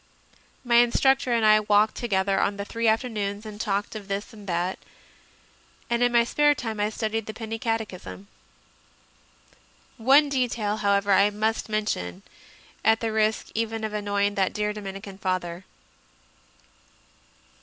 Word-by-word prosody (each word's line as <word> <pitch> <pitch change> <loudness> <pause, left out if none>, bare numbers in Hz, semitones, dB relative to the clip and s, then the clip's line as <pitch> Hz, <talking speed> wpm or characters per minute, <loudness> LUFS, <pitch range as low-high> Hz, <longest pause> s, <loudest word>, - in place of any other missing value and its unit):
My 235 -1 +4
instructor 255 +2 +3
and 230 -2 +2
I 215 0 +6
walked 210 0 +3
together 195 -4 0
on 200 0 0
the 200 - -4
three 230 +2 -2
afternoons 220 -3 -1
and 210 0 -7
talked 205 0 -2
of 205 -2 -7
this 200 +3 -4
and 210 -2 -13
that, 175 +1 -1 1.1
and 235 0 +1
in 245 0 +3
my 235 -1 +5
spare 295 +4 +3
time 225 -5 -5
I 205 +1 +1
studied 220 0 -3
the 215 - -6
Penny 225 -1 -5
Catechism. 215 -4 -4 1.7
One 270 +5 +5
detail, 240 -6 -1
however, 200 -1 +1
I 200 +1 +5
must 220 +2 -2
mention, 100 - -2 0.6
at 220 +1 +4
the 225 -1 -2
risk 220 0 0
even 225 0 -2
of 215 -1 -3
annoying 205 -1 0
that 195 -2 0
dear 210 0 -1
Dominican 195 -1 -8
Father. 185 -1 -3
215 Hz, 145 wpm, -25 LUFS, 200-225 Hz, 1.7 s, I